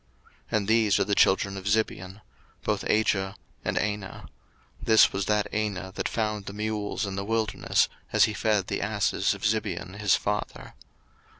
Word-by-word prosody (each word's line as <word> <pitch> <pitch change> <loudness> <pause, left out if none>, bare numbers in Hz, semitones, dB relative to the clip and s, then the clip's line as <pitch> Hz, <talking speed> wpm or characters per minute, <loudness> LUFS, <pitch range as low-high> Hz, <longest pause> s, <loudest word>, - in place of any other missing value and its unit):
01:036:024 - - +1
And 100 -2 -2
these 110 -2 +3
are - - +4
the 100 - -1
children 100 0 +3
of 95 - -8
Zibeon; 100 -2 -1 0.4
both - - -1
Ajah, 100 -2 +1 0.3
and - - -1
Anah: 105 -2 -3 0.5
this 110 -1 +5
was 95 0 -2
that 105 -1 +2
Anah 100 -3 -2
that - - -2
found 105 -3 -2
the 100 - -5
mules 105 0 -2
in 100 -1 -4
the 100 - -3
wilderness, 110 -1 +1 0.2
as - - +5
he 110 - +2
fed 105 -2 +1
the - - -3
asses 100 -1 0
of - - -12
Zibeon 100 -3 -2
his 105 -3 +4
father. 105 +1 -3
105 Hz, 170 wpm, -27 LUFS, 100-110 Hz, 0.5 s, this